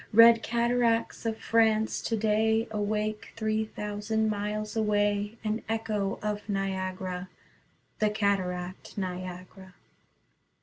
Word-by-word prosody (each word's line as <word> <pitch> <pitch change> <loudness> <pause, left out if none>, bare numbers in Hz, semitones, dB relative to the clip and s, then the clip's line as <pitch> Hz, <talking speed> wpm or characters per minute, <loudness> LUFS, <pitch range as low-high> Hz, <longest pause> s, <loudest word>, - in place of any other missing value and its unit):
Red 230 +1 +8
cataracts 235 -1 +1
of 220 -1 -1
France 220 -1 +2
today 220 0 +1
Awake, 210 0 -2
three 220 -1 0
thousand 215 +1 -1
miles 210 +1 -3
away 205 0 +1
An 215 +1 -1
echo 215 -3 -1
of 210 0 -1
Niagara, 185 -2 -2 0.7
The 215 - +3
cataract 185 -3 -2
Niagara. 185 0 -6
210 Hz, 95 wpm, -29 LUFS, 195-220 Hz, 0.7 s, Red